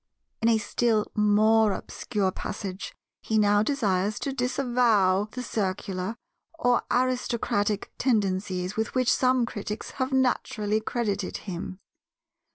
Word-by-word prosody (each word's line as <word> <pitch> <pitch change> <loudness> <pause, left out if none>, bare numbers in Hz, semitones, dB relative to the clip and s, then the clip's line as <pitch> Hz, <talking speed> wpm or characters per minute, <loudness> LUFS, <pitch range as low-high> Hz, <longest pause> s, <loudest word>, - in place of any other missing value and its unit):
In 225 - +4
a 225 - +4
still 220 0 0
more 215 0 +4
obscure 200 -1 -2
passage 190 0 -6 0.3
he 220 - 0
now 205 -1 +4
desires 210 -6 0
to 275 - -2
disavow 240 -7 +2
the 250 +3 -6
Circular 190 -2 -2 0.4
or 245 -6 +3
aristocratic 235 -5 0
tendencies 190 -5 0
with 220 +3 -2
which 255 -1 +3
some 255 -1 +3
critics 210 -2 -5
have 260 +1 0
naturally 220 -5 +1
credited 210 -4 -2
him. 185 -1 -5
215 Hz, 115 wpm, -26 LUFS, 200-245 Hz, 0.4 s, In